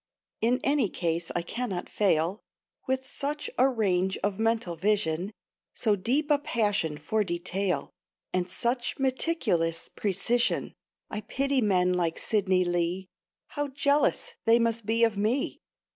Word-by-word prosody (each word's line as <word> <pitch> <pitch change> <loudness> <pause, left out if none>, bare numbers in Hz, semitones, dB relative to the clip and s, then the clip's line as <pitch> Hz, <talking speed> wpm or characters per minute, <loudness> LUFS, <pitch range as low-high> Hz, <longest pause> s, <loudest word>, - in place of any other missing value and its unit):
In 245 +3 +3
any 280 -7 +2
case 170 -1 -2
I 175 - 0
cannot 200 -1 -3
fail, 185 -1 +1 0.5
With 260 0 0
such 285 +3 -2
a 260 +2 +6
range 190 -6 +1
of 205 0 -1
mental 225 -6 +1
vision, 190 -1 0 0.4
So 215 -3 +2
deep 270 +10 0
a 290 - +5
passion 205 - 0
for 210 +8 0
detail, 180 +1 -2 0.4
And 185 0 0
such 240 +5 -1
meticulous 260 - 0
precision. 215 +5 0 0.4
I 210 - -3
pity 275 +3 0
men 180 -4 +3
like 170 -2 0
Sidney 190 -4 +1
Lee; 175 +2 -1 0.4
How 290 0 -2
jealous 285 - +1
they 230 +1 +6
must 230 -2 0
be 230 +1 +3
of 225 -3 +3
me! 220 +7 0
210 Hz, 135 wpm, -28 LUFS, 180-250 Hz, 0.5 s, a